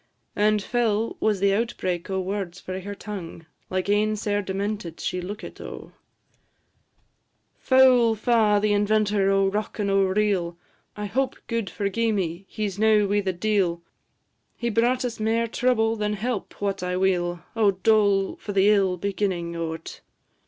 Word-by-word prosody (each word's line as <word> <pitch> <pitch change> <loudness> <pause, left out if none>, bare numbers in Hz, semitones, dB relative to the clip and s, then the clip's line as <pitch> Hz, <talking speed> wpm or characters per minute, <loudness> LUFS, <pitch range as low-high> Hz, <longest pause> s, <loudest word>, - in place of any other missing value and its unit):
And 210 0 +2
fell 225 -2 0
was 215 -3 +1
the 200 0 +3
outbreak 195 -5 -2
o' 190 0 -1
words 190 -1 -4
frae 185 0 -6
her 205 +2 -6
tongue; 180 -6 -8 0.2
Like 185 0 -2
ane 210 +1 +2
sair 205 -1 -1
demented 195 -3 -4
she 180 - -2
lookit, 205 +5 -8
O! - - -9 1.7
"Foul 255 -3 +5
fa' 220 -1 +3
the 210 0 +2
inventor 205 -1 +2
o' 195 0 +3
rock 210 +2 -3
and 200 -2 0
o' 195 0 +4
reel! 190 -3 0 0.4
I 210 - -3
hope, 260 +6 -1
gude 230 -3 -2
forgi'e 225 +3 -1
me! 180 -1 -3
he 215 -1 -2
's 195 0 -7
now 215 -1 +4
wi' 205 +1 +1
the 190 -1 -1
d 210 +4 0
l, 170 -2 0 0.7
He 235 0 -2
brought 245 +3 +2
us 235 -2 -4
mair 225 +2 +1
trouble 225 -1 +1
than 210 -1 -1
help, 215 +1 -4
wot 200 -2 -2
I 180 0 -2
weel; 175 -2 0
O 220 -3 +4
dole 200 0 +2
for 205 - -6
the 195 +1 +4
ill 195 -3 +2
beginnin' 185 -3 -2
o't! 165 -1 -5
205 Hz, 160 wpm, -25 LUFS, 190-215 Hz, 1.7 s, Foul